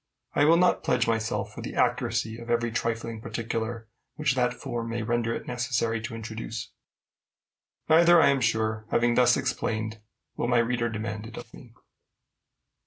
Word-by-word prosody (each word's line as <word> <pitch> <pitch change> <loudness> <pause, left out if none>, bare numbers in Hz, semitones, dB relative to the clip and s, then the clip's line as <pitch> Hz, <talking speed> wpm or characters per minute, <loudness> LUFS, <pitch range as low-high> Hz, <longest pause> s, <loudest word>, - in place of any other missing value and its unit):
I 145 - +4
will 165 +2 +6
not 180 +1 +3
pledge 125 -2 +1
myself 115 0 -1
for - - -8
the - - -6
accuracy 110 +1 0
of 115 0 -10
every 120 0 +1
trifling 115 0 -2
particular 115 0 -4 0.3
which 150 -3 +1
that 125 -1 +1
form 120 -3 -5
may 115 0 -2
render 115 0 0
it - - -6
necessary 120 -2 -1
to 115 +1 -6
introduce; 110 0 -6 1.2
neither, 170 +2 +7
I 160 - +6
am 140 -1 +2
sure, 110 -2 0
having 120 0 +2
thus 125 0 +4
explained, 110 0 -2 0.4
will - - -1
my 125 0 +3
reader 120 0 +1
demand 110 0 -4
it 115 - -11
of 115 - -10
me. 120 -3 -14
115 Hz, 165 wpm, -27 LUFS, 110-125 Hz, 1.2 s, neither